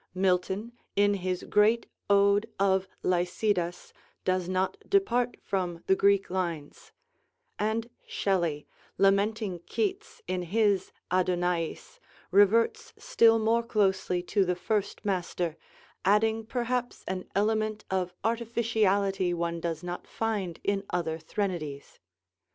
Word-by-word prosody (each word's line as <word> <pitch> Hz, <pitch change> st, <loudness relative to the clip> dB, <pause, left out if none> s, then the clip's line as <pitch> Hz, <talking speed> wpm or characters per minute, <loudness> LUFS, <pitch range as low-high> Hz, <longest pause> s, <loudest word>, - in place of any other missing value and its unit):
Milton 190 Hz, +4 st, 0 dB, 0.2 s
in 205 Hz, 0 st, +4 dB
his 185 Hz, -2 st, -2 dB
great 215 Hz, +3 st, +3 dB, 0.2 s
ode 200 Hz, +2 st, +4 dB
of 190 Hz, -1 st, +2 dB, 0.2 s
'Lycidas' 180 Hz, 0 st, 0 dB, 0.3 s
does 185 Hz, -1 st, 0 dB
not 185 Hz, -, 0 dB
depart 245 Hz, -12 st, +2 dB
from 180 Hz, -3 st, -2 dB
the 190 Hz, -, +4 dB
Greek 200 Hz, -1 st, +3 dB
lines; 170 Hz, -6 st, -4 dB, 0.7 s
and 220 Hz, +2 st, 0 dB, 0.2 s
Shelley, 170 Hz, -7 st, 0 dB, 0.3 s
lamenting 200 Hz, 0 st, +2 dB
Keats 410 Hz, 0 st, -3 dB
in 185 Hz, 0 st, -2 dB
his 200 Hz, +2 st, +1 dB, 0.2 s
'Adonaïs,' 180 Hz, -, -1 dB, 0.3 s
reverts 230 Hz, -, +3 dB
still 230 Hz, -, +4 dB
more 225 Hz, +1 st, +2 dB
closely 190 Hz, -5 st, +1 dB
to 200 Hz, +2 st, +2 dB
the 180 Hz, -1 st, 0 dB
first 205 Hz, +3 st, -2 dB
master, 180 Hz, -4 st, -1 dB, 0.5 s
adding 220 Hz, +3 st, +2 dB
perhaps 245 Hz, 0 st, -2 dB
an 185 Hz, -1 st, -3 dB
element 215 Hz, +1 st, 0 dB
of 185 Hz, -2 st, 0 dB
artificiality 215 Hz, -5 st, +1 dB
one 170 Hz, 0 st, -2 dB
does 165 Hz, -1 st, -3 dB
not 175 Hz, 0 st, -6 dB
find 205 Hz, -7 st, -2 dB
in 200 Hz, -1 st, 0 dB
other 160 Hz, -2 st, -2 dB
threnodies. 160 Hz, -5 st, -4 dB
195 Hz, 110 wpm, -28 LUFS, 180-220 Hz, 0.7 s, in